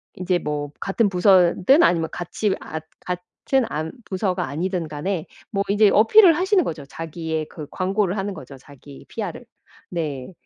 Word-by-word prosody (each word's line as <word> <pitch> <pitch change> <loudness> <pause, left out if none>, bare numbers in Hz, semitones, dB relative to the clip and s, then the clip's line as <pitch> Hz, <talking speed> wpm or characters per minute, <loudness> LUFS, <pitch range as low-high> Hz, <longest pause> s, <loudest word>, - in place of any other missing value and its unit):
인제 180 0 0
뭐 145 -2 -3
같은 205 +2 +1
부서든 185 - +5
아니면 165 -2 +3
같이 190 +3 -2
아 160 - -5 0.2
같은 180 +8 -2
안 155 +2 -3
부서가 185 -2 -1
아니든 170 +3 -2
간에 155 +3 -3 0.3
뭐 200 -2 0
인제 205 +1 +5
어필을 335 - +7
하시는 375 0 +3
거죠. 150 - -5
자기의 160 0 -4
그 150 -3 -8
광고를 195 0 0
하는 195 +1 -2
거죠, 135 - -10
자기 140 +1 -14
PR을. 215 +1 -5 0.4
네. 150 -5 -4
180 Hz, 305 characters per minute, -22 LUFS, 160-200 Hz, 0.4 s, 어필을